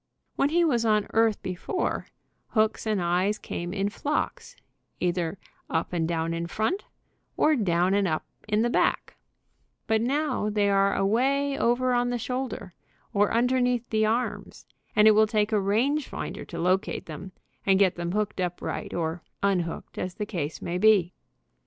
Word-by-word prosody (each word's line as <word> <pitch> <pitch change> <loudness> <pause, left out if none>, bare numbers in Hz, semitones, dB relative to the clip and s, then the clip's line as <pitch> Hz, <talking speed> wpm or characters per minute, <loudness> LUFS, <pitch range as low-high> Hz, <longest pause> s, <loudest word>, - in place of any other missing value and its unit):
When 280 - +2
he 340 +2 +3
was 240 -7 +2
on 215 -2 +3
earth 225 -1 +2
before, 185 - -2 0.4
hooks 220 0 +1
and 215 -2 +1
eyes 180 +4 +1
came 175 -3 -5
in 200 +1 -1
flocks, 290 +8 -3 0.4
either 175 0 -1 0.3
up 160 +2 -1
and 165 -2 0
down 165 0 -1
in 170 0 -3
front, 220 - -1 0.5
or 310 0 +4
down 180 -5 +2
and 200 -1 +2
up 155 -2 -1 0.2
the 215 +3 +2
back, - - +1 0.7
but 220 0 +2
now 265 -3 0
they 205 -1 +2
are 195 0 +3
away 270 +8 +1
over 250 0 +2
on 245 0 +2
the 245 - -1
shoulder, 250 -6 -4 0.4
or 205 0 +3
under 250 +2 +2
neath 245 -1 +1
the 220 -1 +2
arms, 235 +3 -2 0.3
and 210 0 +6
it - - +9
will 215 +1 +5
take 210 -1 +1
a 210 -2 +2
range 250 +9 +1
finder - - -6
to 170 - -8
locate 180 +3 0
them, 165 +4 -8 0.3
and 195 -1 +4
get 190 -2 +4
them 175 0 -4
hooked 210 -2 -1
up 180 -1 -2
right, - - -4
or 165 0 -2 0.2
un 200 -2 +3
hooked, 170 -1 -6
as 185 -1 -4
the 210 - -3
case 165 -7 -4
may 175 +1 -2
be. 195 -4 +4
210 Hz, 170 wpm, -27 LUFS, 180-240 Hz, 0.7 s, it